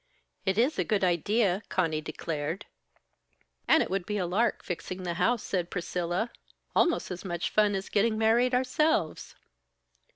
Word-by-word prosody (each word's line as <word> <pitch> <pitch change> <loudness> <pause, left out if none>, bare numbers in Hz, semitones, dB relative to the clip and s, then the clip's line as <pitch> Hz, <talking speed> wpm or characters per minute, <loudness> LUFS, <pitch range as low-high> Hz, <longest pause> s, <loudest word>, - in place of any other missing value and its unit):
"It 190 +1 +2
is 260 +7 +2
a - - +3
good 210 -3 0
idea!" 185 +3 +2
Conny 160 -4 0
declared. 155 +2 -4 1.0
"And 320 - +5
it - - -6
would 190 -2 -1
be 210 - -1
a 185 - 0
lark, 200 +7 +1
fixing 185 +1 -5
the 175 -1 -2
house," 230 +6 +1
said 175 -3 -2
Priscilla. 180 +4 -2 0.4
"Almost 345 - +2
as 180 0 -5
much 175 -2 -3
fun 210 -1 +3
as 195 0 -3
getting 215 +2 +2
married 235 +3 +3
ourselves." 255 - 0
195 Hz, 155 wpm, -29 LUFS, 175-225 Hz, 1.0 s, And